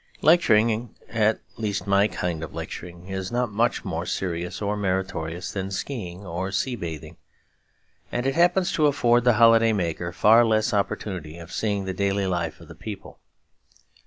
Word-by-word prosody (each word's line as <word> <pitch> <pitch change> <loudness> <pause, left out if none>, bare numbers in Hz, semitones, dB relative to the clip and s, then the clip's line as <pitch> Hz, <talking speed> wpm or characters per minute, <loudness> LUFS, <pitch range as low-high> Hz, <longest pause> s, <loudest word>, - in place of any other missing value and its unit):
Lecturing, 115 -8 +4
at 110 -1 +1 0.2
least 105 -4 -2
my 100 +1 +4
kind 85 -6 -3
of 80 - -8
lecturing, 85 0 -7
is 95 -1 -4
not 120 -2 0
much 115 +4 0
more - - -3
serious 90 -1 -3
or 105 0 -1
meritorious 95 -4 -2
than 95 -1 -3
ski 105 +1 -4
ing 90 +3 -10
or 90 +2 -3
sea 125 +5 -1
bathing; 80 - -7 0.9
and 125 - -2
it 135 - +1
happens 175 +3 +3
to 155 -2 +3
afford 120 -4 +3
the 120 - +6
holiday 115 -1 +5
maker 85 -3 -2
far 110 +6 +6
less 110 -1 +2
opportunity 95 -5 -2
of 85 0 -11
seeing 100 -3 -1
the 95 - -3
daily 100 +1 0
life 85 -4 -2
of 85 - -14
the 85 - -10
people. 100 +4 -9
100 Hz, 165 wpm, -25 LUFS, 90-115 Hz, 0.9 s, the